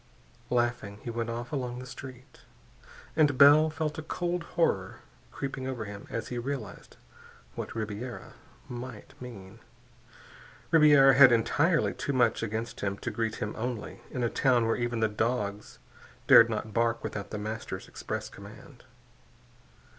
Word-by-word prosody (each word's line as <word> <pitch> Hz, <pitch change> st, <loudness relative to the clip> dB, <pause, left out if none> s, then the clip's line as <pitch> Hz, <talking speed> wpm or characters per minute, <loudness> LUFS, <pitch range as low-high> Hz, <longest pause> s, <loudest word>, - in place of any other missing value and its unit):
Laughing, 120 Hz, -4 st, -1 dB
he 120 Hz, -, -4 dB
went 115 Hz, 0 st, -3 dB
off 120 Hz, +1 st, -5 dB
along 125 Hz, -3 st, -3 dB
the 125 Hz, -, -7 dB
street. 130 Hz, +1 st, -11 dB, 0.8 s
And 145 Hz, -4 st, +3 dB
Bell 145 Hz, +3 st, +7 dB
felt 155 Hz, -1 st, -3 dB
a -, -, -3 dB
cold 175 Hz, +2 st, -2 dB, 0.2 s
horror 95 Hz, -, 0 dB, 0.3 s
creeping 135 Hz, -1 st, -5 dB
over 125 Hz, -5 st, -4 dB
him 100 Hz, -1 st, -9 dB
as 115 Hz, -, -4 dB
he 125 Hz, -, -3 dB
realized 120 Hz, -5 st, -6 dB, 0.6 s
what -, -, -6 dB
Ribiera 110 Hz, +3 st, -5 dB, 0.3 s
might 120 Hz, -2 st, -8 dB
mean. 100 Hz, -7 st, -10 dB, 1.1 s
Ribiera 145 Hz, -4 st, +7 dB
had 130 Hz, -1 st, +8 dB
entirely 145 Hz, +9 st, +2 dB
too 140 Hz, -, -3 dB
much 120 Hz, -3 st, +2 dB
against 115 Hz, +1 st, -4 dB
him 100 Hz, -1 st, -2 dB
to 120 Hz, -, -4 dB
greet 110 Hz, 0 st, -2 dB
him 105 Hz, -, -4 dB
only, 120 Hz, -1 st, -5 dB
in 125 Hz, -, -3 dB
a -, -, +3 dB
town 125 Hz, -4 st, +3 dB
where 115 Hz, -, +1 dB
even 120 Hz, -1 st, -2 dB
the 110 Hz, -, +4 dB
dogs 105 Hz, -1 st, -2 dB, 0.5 s
dared 115 Hz, 0 st, +8 dB
not 110 Hz, -1 st, -4 dB
bark 115 Hz, 0 st, +1 dB
without 100 Hz, -1 st, -5 dB
The 105 Hz, -, -5 dB
Master's 110 Hz, +2 st, -5 dB
express -, -, -5 dB
command. -, -, -13 dB
120 Hz, 145 wpm, -29 LUFS, 110-135 Hz, 1.1 s, had